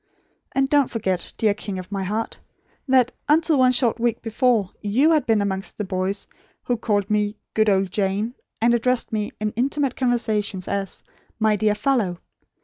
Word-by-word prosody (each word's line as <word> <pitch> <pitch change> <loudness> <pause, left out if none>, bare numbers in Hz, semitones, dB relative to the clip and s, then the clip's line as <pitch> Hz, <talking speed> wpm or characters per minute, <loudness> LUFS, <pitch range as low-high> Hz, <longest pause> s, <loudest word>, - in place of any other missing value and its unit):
And 270 0 +2
don't 285 -2 +3
forget, 190 -6 -2
dear 215 -2 +3
King 205 -2 -6
of 185 +1 -8
my 195 -1 -2
heart, 215 +4 -3 0.5
that, 255 -2 +4 0.2
until 315 -1 +4
one 255 -1 +5
short 240 -2 +2
week 235 -1 0
before, 225 -3 +1
you 245 +10 +3
had 310 -2 +2
been 220 -3 +3
amongst 195 0 -4
the 210 - -2
boys 190 +1 -2 0.4
who 245 - 0
called 205 -3 0
me 210 0 0 0.2
'good 215 0 +3
old 190 -2 +2
Jane,' 205 +4 -1 0.3
and 235 +1 +3
addressed 245 +1 +1
me 210 -1 -1
in 210 0 -1
intimate 270 +3 0
conversation 220 -6 0
as 200 -1 -4 0.3
'my 220 -1 +3
dear 210 0 +1
fellow'! 210 -6 0
215 Hz, 170 wpm, -23 LUFS, 200-250 Hz, 0.5 s, one